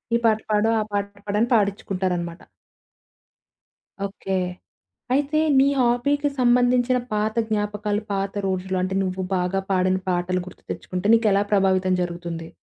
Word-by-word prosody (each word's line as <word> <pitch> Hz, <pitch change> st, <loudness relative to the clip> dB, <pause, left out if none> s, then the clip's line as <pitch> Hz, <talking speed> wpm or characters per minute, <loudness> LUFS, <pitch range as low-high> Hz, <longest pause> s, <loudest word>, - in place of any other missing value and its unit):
ఈ -, -, +5 dB
పాట 220 Hz, -1 st, +4 dB
పాడు, 210 Hz, +1 st, +3 dB
ఆ -, -, 0 dB
పాట 200 Hz, 0 st, 0 dB, 0.2 s
పాడని 210 Hz, +3 st, +1 dB
పాడించుకుంటారన్నమాట. 185 Hz, -5 st, -1 dB, 1.6 s
ఓకే. 195 Hz, -1 st, -4 dB, 0.8 s
అయితే, 290 Hz, +2 st, +1 dB, 0.2 s
నీ 270 Hz, -, +6 dB
హాబీ‌కి 265 Hz, +4 st, +2 dB
సంబంధించిన 245 Hz, 0 st, +3 dB
పాత 215 Hz, +1 st, 0 dB
జ్ఞాపకాలు, 210 Hz, -1 st, -1 dB
పాత 195 Hz, 0 st, -1 dB
రోజులు, 185 Hz, 0 st, -2 dB
అంటే 185 Hz, +1 st, -2 dB
నువ్వు 185 Hz, 0 st, -2 dB
బాగా 180 Hz, +2 st, 0 dB
పాడిన 185 Hz, 0 st, +2 dB
పాటలు 180 Hz, +1 st, 0 dB
గుర్తుతెచ్చుకుంటే, 185 Hz, 0 st, -6 dB
నీకెలా 210 Hz, -3 st, +3 dB
ప్రభావితం 190 Hz, -2 st, +3 dB
జరుగుతుంది? 170 Hz, -1 st, -5 dB
200 Hz, 120 wpm, -23 LUFS, 185-225 Hz, 1.6 s, నీ